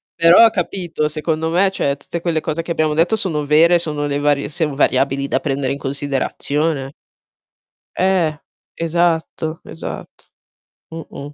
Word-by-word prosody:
però, 175 Hz, +7 st, +7 dB
capito, 175 Hz, -5 st, -2 dB
secondo 160 Hz, +1 st, -2 dB
me, 185 Hz, +3 st, +3 dB
cioè 140 Hz, -6 st, -1 dB
tutte 165 Hz, +4 st, -6 dB
quelle 165 Hz, -2 st, 0 dB
cose 155 Hz, +2 st, -3 dB
che 170 Hz, -, -6 dB
abbiamo 155 Hz, -2 st, +1 dB
detto 165 Hz, +8 st, +2 dB
sono 155 Hz, -7 st, -1 dB
vere, 165 Hz, +4 st, +5 dB
sono 150 Hz, -3 st, -3 dB
le 145 Hz, 0 st, -1 dB
varie 145 Hz, -1 st, +1 dB
son 155 Hz, -2 st, -2 dB
variabili 135 Hz, 0 st, +1 dB
da 135 Hz, -, 0 dB
prendere 135 Hz, -1 st, -1 dB
in -, -, -5 dB
considerazione. 140 Hz, +1 st, -2 dB, 1.1 s
Eh. 180 Hz, -5 st, +1 dB, 0.4 s
Esatto, 165 Hz, -1 st, -1 dB
esat 165 Hz, -, -9 dB, 0.6 s
mh-mh. 145 Hz, -3 st, -8 dB
155 Hz, 140 wpm, -19 LUFS, 145-170 Hz, 1.1 s, però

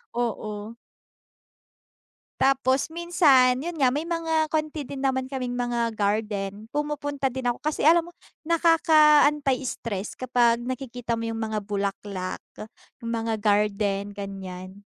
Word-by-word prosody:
oo. 220 Hz, -2 st, -3 dB, 1.6 s
Tapos 270 Hz, +1 st, +2 dB
minsan, 300 Hz, -7 st, +4 dB
'yon 340 Hz, +2 st, -5 dB
nga, 260 Hz, -4 st, +3 dB
may 305 Hz, +4 st, -3 dB
mga 325 Hz, -2 st, 0 dB
konti 310 Hz, 0 st, -2 dB
din 275 Hz, -1 st, -5 dB
naman 260 Hz, -1 st, 0 dB
kaming 255 Hz, -2 st, -3 dB
mga 235 Hz, -1 st, -1 dB
garden, 205 Hz, -1 st, -2 dB
pumupunta 290 Hz, -2 st, -2 dB
din 260 Hz, 0 st, -6 dB
ako, 245 Hz, -1 st, -1 dB
kasi 305 Hz, -1 st, -2 dB
alam 335 Hz, +2 st, +5 dB
mo, 350 Hz, -, -16 dB, 0.3 s
nakaka-anti-stress 295 Hz, -, +3 dB
kapag 240 Hz, -2 st, +2 dB
nakikita 245 Hz, -2 st, -4 dB
mo 230 Hz, -, -3 dB
yung 225 Hz, -, -3 dB
mga 220 Hz, -1 st, -2 dB
bulaklak, 200 Hz, -2 st, -4 dB, 0.6 s
yung 230 Hz, -, -3 dB
mga 225 Hz, -1 st, -1 dB
garden, 205 Hz, -1 st, +1 dB
ganiyan. 190 Hz, -1 st, -7 dB
245 Hz, 120 wpm, -25 LUFS, 210-295 Hz, 1.6 s, alam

